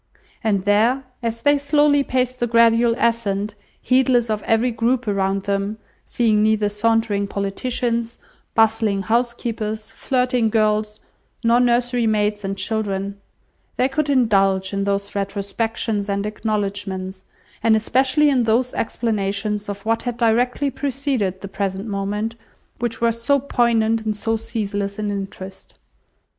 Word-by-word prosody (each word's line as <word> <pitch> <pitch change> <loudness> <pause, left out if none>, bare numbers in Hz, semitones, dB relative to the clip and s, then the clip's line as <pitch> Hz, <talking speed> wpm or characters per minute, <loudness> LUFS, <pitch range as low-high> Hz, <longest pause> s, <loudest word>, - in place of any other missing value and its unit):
And 200 -3 +1
there, 225 +6 +3 0.2
as 230 -1 -3
they 290 0 +4
slowly 285 0 +3
paced 255 -1 -1
the 240 - +1
gradual 230 0 +4
ascent, 215 -3 0 0.3
heedless 255 -3 +2
of 210 -1 -1
every 225 +2 +2
group 235 +2 0
around 195 -1 0
them, 200 +1 -1 0.3
seeing 220 -3 +2
neither 215 -1 +2
sauntering 210 -1 +1
politicians, 230 +4 -2 0.4
bustling 220 -3 +2
housekeepers, 225 -1 -2
flirting 250 -3 0
girls, 215 -1 +1 0.4
nor 230 +1 +4
nursery 245 -1 +2
maids 210 -1 0
and 195 0 -3
children, 200 -1 -2 0.5
they 255 - +2
could 285 +2 -1
indulge 195 -7 +2
in 200 0 -1
those 200 0 -1
retrospections 205 +1 -2
and 200 0 -1
acknowledgements, 200 -3 -3 0.4
and 225 -1 +4
especially 260 +7 +2
in 255 -4 +2
those 240 +3 +1
explanations 210 -2 -2
of 200 0 -6
what 225 +1 +1
had 245 -1 -4
directly 245 +4 +1
preceded 265 -9 -2
the 195 - -6
present 195 0 -3
moment, 205 +2 -2 0.5
which 235 -1 -3
were 235 0 +3
so 235 +5 +1
poignant 230 -4 +1
and 215 -1 -1
so 225 +1 0
ceaseless 205 -3 -3
in 210 -1 -2
interest. 195 -1 -7
220 Hz, 130 wpm, -21 LUFS, 200-240 Hz, 0.5 s, they